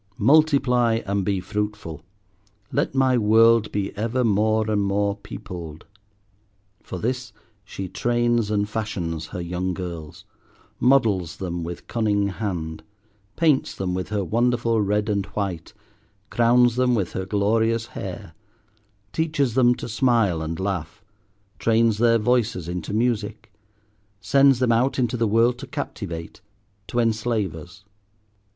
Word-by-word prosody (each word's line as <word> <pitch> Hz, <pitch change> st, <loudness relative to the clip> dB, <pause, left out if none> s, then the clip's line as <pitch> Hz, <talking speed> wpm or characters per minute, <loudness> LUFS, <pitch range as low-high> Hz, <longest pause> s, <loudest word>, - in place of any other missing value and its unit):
"Multiply 125 Hz, -4 st, +3 dB
and 100 Hz, 0 st, -1 dB
be 100 Hz, -1 st, 0 dB
fruitful; 105 Hz, -5 st, -4 dB, 0.7 s
let 140 Hz, +1 st, -1 dB
my 130 Hz, -2 st, +3 dB
world 115 Hz, +1 st, +4 dB
be 100 Hz, -1 st, -3 dB
ever 115 Hz, +4 st, -1 dB
more 110 Hz, 0 st, +2 dB
and 105 Hz, -1 st, +1 dB
more 100 Hz, 0 st, 0 dB
peopled." 85 Hz, -6 st, -9 dB, 1.0 s
For -, -, -7 dB
this 125 Hz, +5 st, -3 dB, 0.3 s
she 95 Hz, -1 st, -6 dB
trains 120 Hz, +1 st, 0 dB
and 105 Hz, -1 st, 0 dB
fashions 90 Hz, -8 st, -4 dB
her -, -, -7 dB
young 90 Hz, +1 st, -3 dB
girls, 85 Hz, -3 st, -7 dB, 0.5 s
models 110 Hz, -10 st, +2 dB
them 85 Hz, -2 st, -4 dB
with 85 Hz, +1 st, -7 dB
cunning 105 Hz, -3 st, 0 dB
hand, 90 Hz, -6 st, -4 dB, 0.5 s
paints 155 Hz, -5 st, +2 dB
them 95 Hz, -2 st, -2 dB
with 90 Hz, 0 st, -3 dB
her 105 Hz, -2 st, -1 dB
wonderful 115 Hz, +2 st, +1 dB
red 105 Hz, +1 st, 0 dB
and 100 Hz, -2 st, -1 dB
white, 95 Hz, -6 st, -4 dB, 0.6 s
crowns 120 Hz, 0 st, +4 dB
them 125 Hz, -1 st, +3 dB
with 100 Hz, -6 st, -1 dB
her 95 Hz, 0 st, -4 dB
glorious 110 Hz, +3 st, +1 dB
hair, 90 Hz, -6 st, -7 dB, 0.8 s
teaches 150 Hz, -6 st, 0 dB
them 125 Hz, -1 st, +4 dB
to -, -, -7 dB
smile 115 Hz, -8 st, +2 dB
and 80 Hz, +1 st, -4 dB
laugh, 95 Hz, 0 st, -4 dB, 0.6 s
trains 115 Hz, -1 st, +2 dB
their 115 Hz, 0 st, +4 dB
voices 115 Hz, -6 st, 0 dB
into 90 Hz, +1 st, -4 dB
music, 110 Hz, -1 st, -2 dB, 0.7 s
sends 135 Hz, +2 st, +4 dB
them 125 Hz, -1 st, +2 dB
out 125 Hz, +4 st, +2 dB
into 125 Hz, -2 st, 0 dB
the 115 Hz, -2 st, +1 dB
world 115 Hz, +3 st, +2 dB
to 135 Hz, -, -8 dB
captivate, 100 Hz, -, -6 dB, 0.5 s
to -, -, -5 dB
enslave 110 Hz, -4 st, 0 dB
us. 90 Hz, +4 st, -12 dB
110 Hz, 130 wpm, -23 LUFS, 95-120 Hz, 1.0 s, world